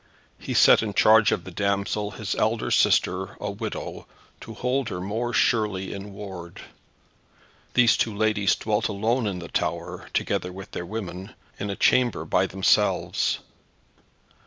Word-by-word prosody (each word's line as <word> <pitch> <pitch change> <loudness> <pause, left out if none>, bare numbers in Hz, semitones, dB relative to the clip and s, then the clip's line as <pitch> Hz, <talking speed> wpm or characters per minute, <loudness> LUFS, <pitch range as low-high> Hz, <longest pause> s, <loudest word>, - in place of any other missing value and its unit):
He - - -5
set - - +7
in 105 -3 -4
charge 110 -1 +6
of 85 - -1
the 95 - -9
damsel 100 +2 -1
his 105 -1 -4
elder 110 +1 0
sister, 95 +1 +2
a 100 - -3
widow, 110 +2 -6 0.3
to - - -10
hold 125 0 -1
her 90 - -4
more 110 +6 -2
surely 105 -7 +1
in 100 +1 -8
ward. 95 -4 -9 1.1
These 125 -2 +5
two 110 -3 0
ladies 105 -2 +2
dwelt 105 -1 -1
alone 110 +3 0
in 95 -3 -3
the 85 -1 -7
tower, - - -3
together 90 - -1
with 95 +1 -10
their 85 - -5
women, 95 -3 -6 0.2
in 105 - -3
a 100 - -2
chamber 125 +2 +2
by - - +2
themselves. 95 0 +1
105 Hz, 150 wpm, -25 LUFS, 95-110 Hz, 1.1 s, set